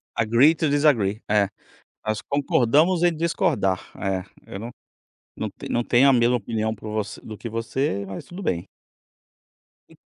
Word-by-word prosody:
Agree 120 Hz, +8 st, +4 dB
to 155 Hz, -2 st, 0 dB
desagree. 120 Hz, -8 st, +2 dB
É, 105 Hz, -2 st, +3 dB, 0.6 s
nós 110 Hz, -1 st, -1 dB
concordamos 145 Hz, +5 st, +2 dB
em 175 Hz, -2 st, +3 dB
discordar, 105 Hz, -, +1 dB, 0.2 s
é, 95 Hz, -2 st, -2 dB, 0.2 s
eu 95 Hz, -, -7 dB
não 115 Hz, +2 st, -6 dB, 0.6 s
não -, -, -3 dB, 0.2 s
não 120 Hz, -, +1 dB
tenho 130 Hz, +3 st, +5 dB
a -, -, +5 dB
mesma 120 Hz, 0 st, +3 dB
opinião 110 Hz, 0 st, -2 dB
por 105 Hz, +1 st, -8 dB
você 110 Hz, -1 st, -4 dB
do 110 Hz, -1 st, -9 dB
que 115 Hz, -, -7 dB
você, 115 Hz, -1 st, -2 dB
mas 95 Hz, -1 st, -7 dB
tudo 180 Hz, +3 st, -9 dB
bem. 85 Hz, -, -2 dB, 1.2 s
E -, -, -19 dB
115 Hz, 155 wpm, -24 LUFS, 105-145 Hz, 1.2 s, tenho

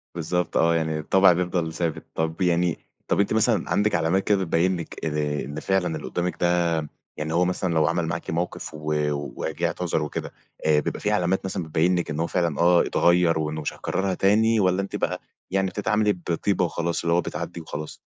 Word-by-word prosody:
بالضبط 85 Hz, +1 st, -1 dB
آه، 85 Hz, 0 st, +4 dB
يعني 80 Hz, -1 st, -1 dB
الطبع 95 Hz, +4 st, +5 dB
بيفضل 90 Hz, -2 st, -1 dB
ثابت، 80 Hz, -1 st, -2 dB
طَب 80 Hz, +3 st, -2 dB
يعني 85 Hz, -1 st, +2 dB, 0.3 s
طب -, -, +1 dB
أنتِ 100 Hz, -, +2 dB
مثلًا 110 Hz, -3 st, +2 dB
عندك 105 Hz, +1 st, +2 dB
علامات 85 Hz, +3 st, +1 dB
كده 105 Hz, -, +3 dB
بتبين 90 Hz, +1 st, +1 dB
لك 85 Hz, -, -7 dB
آآ، 75 Hz, -1 st, -1 dB
إن 75 Hz, +2 st, -6 dB
فعلًا 90 Hz, -2 st, 0 dB
اللي -, -, -7 dB
قدامِك 90 Hz, -2 st, -2 dB
ده 85 Hz, 0 st, +3 dB, 0.5 s
يعني 75 Hz, +1 st, -3 dB
هو 90 Hz, +2 st, +4 dB
مثلًا 90 Hz, -1 st, -1 dB
لو 80 Hz, -1 st, +3 dB
عمل 85 Hz, 0 st, 0 dB
معاكِ 85 Hz, +1 st, -4 dB
موقف 85 Hz, +1 st, -3 dB
و 75 Hz, -1 st, -1 dB, 0.3 s
وجه 80 Hz, +2 st, -2 dB
اعتذر 85 Hz, 0 st, -1 dB
وكده 75 Hz, -, -4 dB, 0.3 s
آآ 75 Hz, -1 st, +4 dB
بيبقى -, -, -4 dB
فيه 105 Hz, -, 0 dB
علامات 95 Hz, -2 st, +1 dB
مثلًا 95 Hz, -1 st, -3 dB
بتبين 80 Hz, +3 st, +1 dB
لِك 85 Hz, -, -3 dB
إن 75 Hz, +1 st, -3 dB
هو 85 Hz, -, +1 dB
فعلًا 85 Hz, -4 st, -1 dB
آه 85 Hz, 0 st, +5 dB
اتغير 85 Hz, -1 st, +3 dB
وإنه 80 Hz, 0 st, -2 dB
مش 75 Hz, -, -3 dB
هيكررها 95 Hz, -1 st, -2 dB
تاني، 110 Hz, +4 st, +3 dB
والّا 95 Hz, 0 st, +2 dB
أنتِ 100 Hz, -, -5 dB
بقى -, -, -2 dB, 0.3 s
يعني 95 Hz, 0 st, +1 dB
بتتعاملي 105 Hz, +2 st, +1 dB
بطيبة 90 Hz, +1 st, -1 dB
وخلاص 85 Hz, 0 st, -2 dB
اللي 85 Hz, 0 st, +1 dB
هو 85 Hz, -, +4 dB
بتعدي 85 Hz, -, -5 dB
وخلاص؟ 75 Hz, -1 st, -7 dB
85 Hz, 200 wpm, -24 LUFS, 80-95 Hz, 0.5 s, الطبع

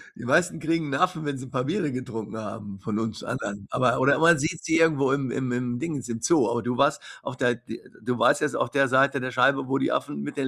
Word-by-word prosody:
Die 115 Hz, -, -9 dB
meisten 170 Hz, +6 st, +2 dB
kriegen 165 Hz, 0 st, -1 dB
'n 135 Hz, -, -1 dB
Affen, 180 Hz, -2 st, +1 dB
wenn 145 Hz, -2 st, -2 dB
sie 130 Hz, -, -8 dB
'n 125 Hz, -, -14 dB
paar 125 Hz, -1 st, -1 dB
Biere 160 Hz, -1 st, -1 dB
getrunken 110 Hz, -4 st, -6 dB
haben 105 Hz, -2 st, -7 dB
von 105 Hz, +2 st, -3 dB
uns 110 Hz, -1 st, -4 dB
anderen, 100 Hz, -1 st, -5 dB
aber 125 Hz, -1 st, +2 dB
oder 140 Hz, +3 st, +4 dB
man 165 Hz, -1 st, +6 dB
sieht 160 Hz, +2 st, -2 dB
sie 160 Hz, -, +2 dB
irgendwo 145 Hz, -5 st, +3 dB
im 135 Hz, -2 st, 0 dB
im 130 Hz, -2 st, -2 dB
im 120 Hz, 0 st, -2 dB
Dingens 145 Hz, -6 st, -4 dB
im 115 Hz, -1 st, -4 dB
Zoo, 170 Hz, -, +3 dB
aber 120 Hz, -1 st, -1 dB
du 120 Hz, 0 st, -2 dB
warst 140 Hz, +1 st, +2 dB, 0.2 s
auf 135 Hz, -2 st, -7 dB
der 120 Hz, -2 st, +2 dB
de -, -, -10 dB, 0.2 s
du 125 Hz, -1 st, -2 dB
warst 145 Hz, +4 st, +4 dB
jetzt 150 Hz, -, 0 dB
auf -, -, 0 dB
der 140 Hz, -1 st, +3 dB
Seite 135 Hz, +2 st, +3 dB
der 130 Hz, 0 st, -3 dB
Scheibe, 135 Hz, +1 st, +2 dB
wo 135 Hz, +1 st, +1 dB
die -, -, 0 dB
Affen 70 Hz, -, -2 dB
mit 70 Hz, -, -7 dB
den 135 Hz, -2 st, 0 dB
130 Hz, 265 wpm, -25 LUFS, 120-150 Hz, 0.2 s, man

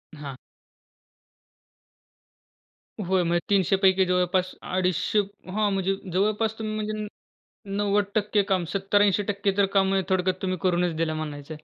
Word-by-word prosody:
हां. 140 Hz, -3 st, -8 dB, 2.7 s
होय. 185 Hz, 0 st, +2 dB
म्हणजे 170 Hz, 0 st, +1 dB
300 195 Hz, -2 st, +3 dB
पैकी 190 Hz, -1 st, +4 dB
जवळपास 180 Hz, 0 st, +1 dB
अडीचशे 185 Hz, +2 st, 0 dB, 0.3 s
हां, 210 Hz, +1 st, +1 dB
म्हणजे 195 Hz, 0 st, 0 dB, 0.2 s
जवळपास 215 Hz, +3 st, +1 dB
तुम्ही 215 Hz, -1 st, -3 dB
म्हणजे 215 Hz, 0 st, -3 dB
न 215 Hz, 0 st, -4 dB, 0.7 s
90% 205 Hz, 0 st, +1 dB
काम, 185 Hz, -3 st, +1 dB
70-80% 200 Hz, 0 st, +1 dB
तर 200 Hz, -, +5 dB
काम 195 Hz, -1 st, +4 dB
म्हणजे 190 Hz, -1 st, +1 dB
थोडक्यात 185 Hz, 0 st, 0 dB
तुम्ही 185 Hz, -1 st, -1 dB
करूनच 180 Hz, -2 st, +1 dB
दिलं 160 Hz, -1 st, 0 dB
म्हणायचं 150 Hz, -1 st, -6 dB
आहे. 155 Hz, -, -14 dB
190 Hz, 130 wpm, -25 LUFS, 180-205 Hz, 2.7 s, तर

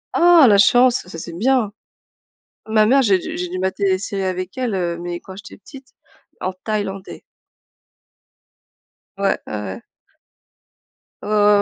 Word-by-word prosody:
Ah 345 Hz, -4 st, +6 dB
la 205 Hz, -3 st, +5 dB
chance, 245 Hz, -1 st, +4 dB
ça, 165 Hz, -, -9 dB
c'est 170 Hz, +1 st, -8 dB
bien! 230 Hz, 0 st, +1 dB, 0.9 s
Ma 220 Hz, -1 st, +3 dB
mère, 265 Hz, +5 st, +4 dB
j'ai 205 Hz, -7 st, +3 dB
dû -, -, -6 dB
j'ai 180 Hz, 0 st, -3 dB
dû 185 Hz, -, -5 dB
mater 190 Hz, +2 st, -2 dB
des 190 Hz, -1 st, +3 dB
séries 195 Hz, 0 st, -4 dB
avec 185 Hz, +3 st, -4 dB
elle, 245 Hz, -5 st, -1 dB
heu, 175 Hz, -2 st, -2 dB
mais 175 Hz, 0 st, -5 dB
quand 190 Hz, -, -12 dB
j'étais 200 Hz, -, -12 dB
petite, 265 Hz, +6 st, -15 dB, 0.5 s
en 185 Hz, -, -2 dB
thaïlandais. 195 Hz, 0 st, -5 dB, 2.0 s
Ouais. 200 Hz, 0 st, 0 dB
Ouais, -, -, -7 dB
ouais. 105 Hz, -3 st, -6 dB, 1.4 s
Ouais, -, -, -7 dB
ouais, 210 Hz, -1 st, +4 dB
200 Hz, 150 wpm, -20 LUFS, 185-220 Hz, 2.0 s, Ah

